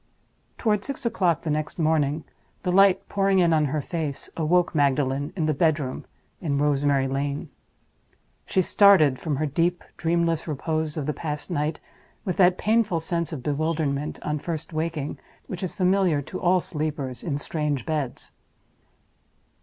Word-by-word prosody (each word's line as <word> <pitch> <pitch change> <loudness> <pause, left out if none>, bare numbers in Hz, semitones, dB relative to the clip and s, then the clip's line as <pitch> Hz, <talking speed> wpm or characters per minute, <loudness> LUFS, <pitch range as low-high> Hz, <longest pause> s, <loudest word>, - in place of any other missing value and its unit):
Toward 210 -3 +1
six 275 -2 -5
o'clock 180 -8 +1
the 160 - -1
next 155 0 -2
morning, 155 -2 +1 0.4
the 180 - 0
light 195 0 +5
pouring 195 -1 +2
in 170 -3 +4
on 155 -1 +3
her 150 +1 -1
face 155 -4 -4
awoke 175 +2 +2
Magdalen 140 -1 +1
in 165 -5 0
the 155 - +2
bedroom 150 -3 0 0.4
in 145 -5 0
Rosemary 140 -1 +2
Lane. 140 +2 -3 1.0
She 190 - +2
started 170 -10 +5
from 155 -4 -2
her 155 +3 0
deep, 170 +4 0
dreamless 165 -1 0
repose 155 +1 -2
of 150 - -2
the 150 - -1
past 150 +3 -5
night 150 -1 -1 0.5
with 185 -4 -2
that 180 -1 +5
painful 215 -6 +2
sense 170 +1 -2
of 145 -6 -6
bewilderment, 150 -1 -1
on 150 0 -1
first 165 +1 -5
waking, 155 -2 -3 0.3
which 180 - -6
is 185 - -4
familiar 185 -4 +2
to - - -7
all 180 +1 +4
sleepers 150 -6 -4
in 145 -5 -2
strange 150 -2 -2
beds. 150 -6 -3
155 Hz, 155 wpm, -25 LUFS, 145-175 Hz, 1.0 s, light